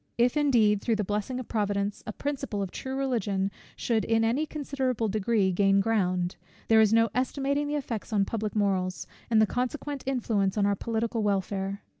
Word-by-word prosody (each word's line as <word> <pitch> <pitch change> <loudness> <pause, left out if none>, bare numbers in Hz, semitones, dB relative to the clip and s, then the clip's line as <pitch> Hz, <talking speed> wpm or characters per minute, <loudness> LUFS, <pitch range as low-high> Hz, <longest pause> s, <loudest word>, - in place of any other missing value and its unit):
If 240 +3 +3
indeed, 230 -9 +3
through 230 - +1
the 210 - -1
blessing 210 +6 -2
of 255 - -7
Providence, 205 -2 -1
a - - -2
principle 275 -5 -3
of 190 - -5
true 265 0 -5
Religion 210 -8 0 0.2
should 225 -2 0
in 225 0 +2
any 255 +8 +1
considerable 265 -6 -2
degree 210 -1 +1
gain 195 +2 +3
ground, 185 -4 0 0.3
there 220 -1 +7
is 215 -1 +4
no 230 0 +4
estimating 280 +3 0
the 295 - -1
effects 240 -7 -4
on 200 -2 +2
public 215 0 -3
morals, 190 -3 0 0.2
and 225 -2 +4
the 220 - +6
consequent 265 +5 -3
influence 220 -7 0
on 205 - +3
our 200 0 +2
political 230 +2 -2
welfare. 195 -1 -1
220 Hz, 180 wpm, -28 LUFS, 200-250 Hz, 0.3 s, there